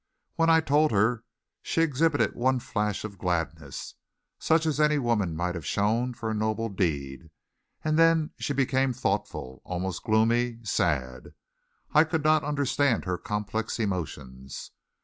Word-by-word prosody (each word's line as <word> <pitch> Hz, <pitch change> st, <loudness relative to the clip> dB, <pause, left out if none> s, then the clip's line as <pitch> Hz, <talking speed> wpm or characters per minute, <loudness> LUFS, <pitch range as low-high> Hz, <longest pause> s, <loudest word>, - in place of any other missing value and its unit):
When 165 Hz, 0 st, +3 dB
I 160 Hz, 0 st, +6 dB
told 150 Hz, +1 st, +3 dB
her 110 Hz, +3 st, +1 dB, 0.4 s
she 165 Hz, -, +1 dB
exhibited 155 Hz, 0 st, +2 dB
one 130 Hz, +1 st, +1 dB
flash 105 Hz, -3 st, -2 dB
of 100 Hz, -3 st, -7 dB
gladness, 80 Hz, -5 st, -3 dB, 0.5 s
such 160 Hz, 0 st, +2 dB
as 155 Hz, -2 st, 0 dB
any 150 Hz, 0 st, +4 dB
woman 110 Hz, -, 0 dB
might 90 Hz, +2 st, -1 dB
have 85 Hz, -3 st, -6 dB
shown 115 Hz, -, 0 dB
for 115 Hz, -1 st, -5 dB
a -, -, -1 dB
noble 110 Hz, +1 st, -1 dB
deed 80 Hz, -6 st, -2 dB, 0.5 s
and 155 Hz, +1 st, +1 dB
then 165 Hz, -2 st, +4 dB
she 145 Hz, -, -2 dB
became 130 Hz, -1 st, +1 dB
thoughtful, 65 Hz, -, -3 dB
almost 90 Hz, +1 st, -3 dB
gloomy, 115 Hz, +2 st, +2 dB
sad. 70 Hz, -, -1 dB, 0.6 s
I 155 Hz, -, +7 dB
could 160 Hz, -1 st, -2 dB
not 155 Hz, 0 st, +4 dB
understand 140 Hz, -4 st, +1 dB
her 90 Hz, -2 st, -2 dB
complex 105 Hz, +2 st, -3 dB
emotions. 70 Hz, -, -5 dB
115 Hz, 145 wpm, -27 LUFS, 90-145 Hz, 0.6 s, I